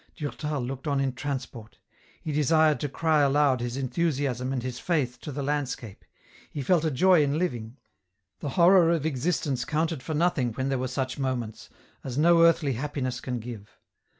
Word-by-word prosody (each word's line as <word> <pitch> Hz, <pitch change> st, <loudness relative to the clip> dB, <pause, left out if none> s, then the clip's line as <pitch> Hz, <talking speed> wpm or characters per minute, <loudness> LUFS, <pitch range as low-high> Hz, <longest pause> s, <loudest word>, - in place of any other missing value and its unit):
Durtal 150 Hz, -2 st, -3 dB
looked 135 Hz, +4 st, -5 dB
on 140 Hz, -1 st, +1 dB
in 135 Hz, -2 st, 0 dB
transport. 125 Hz, -4 st, -6 dB, 0.4 s
He 155 Hz, -, -5 dB
desired 155 Hz, +1 st, +3 dB
to 145 Hz, -, -2 dB
cry 160 Hz, +1 st, +2 dB
aloud 140 Hz, -2 st, +3 dB
his 120 Hz, +1 st, -3 dB
enthusiasm 135 Hz, -2 st, -1 dB
and 130 Hz, -3 st, -2 dB
his 125 Hz, -1 st, -5 dB
Faith 130 Hz, -8 st, -1 dB
to 150 Hz, -, -6 dB
the 140 Hz, +1 st, -4 dB
landscape; 135 Hz, -7 st, -3 dB, 0.5 s
he 145 Hz, -, -5 dB
felt 165 Hz, +4 st, +2 dB
a 160 Hz, -, +2 dB
joy 175 Hz, +5 st, +4 dB
in 145 Hz, +1 st, 0 dB
living. 120 Hz, -8 st, -3 dB, 0.6 s
The 145 Hz, -, -4 dB
horror 175 Hz, -1 st, +6 dB
of 165 Hz, -3 st, +1 dB
existence 140 Hz, -2 st, -1 dB
counted 160 Hz, -3 st, -1 dB
for 155 Hz, +4 st, -4 dB
nothing 150 Hz, -8 st, +1 dB
when 130 Hz, +4 st, -2 dB
there 135 Hz, -2 st, 0 dB
were 130 Hz, -, -1 dB
such 130 Hz, +2 st, -3 dB
moments, 125 Hz, -5 st, -3 dB, 0.3 s
as 130 Hz, -1 st, -5 dB
no 165 Hz, +2 st, +5 dB
earthly 165 Hz, -4 st, +4 dB
happi 140 Hz, +3 st, -4 dB
ness 125 Hz, -1 st, -2 dB
can 125 Hz, -1 st, -4 dB
give. 110 Hz, -3 st, -9 dB
140 Hz, 180 wpm, -27 LUFS, 125-155 Hz, 0.6 s, horror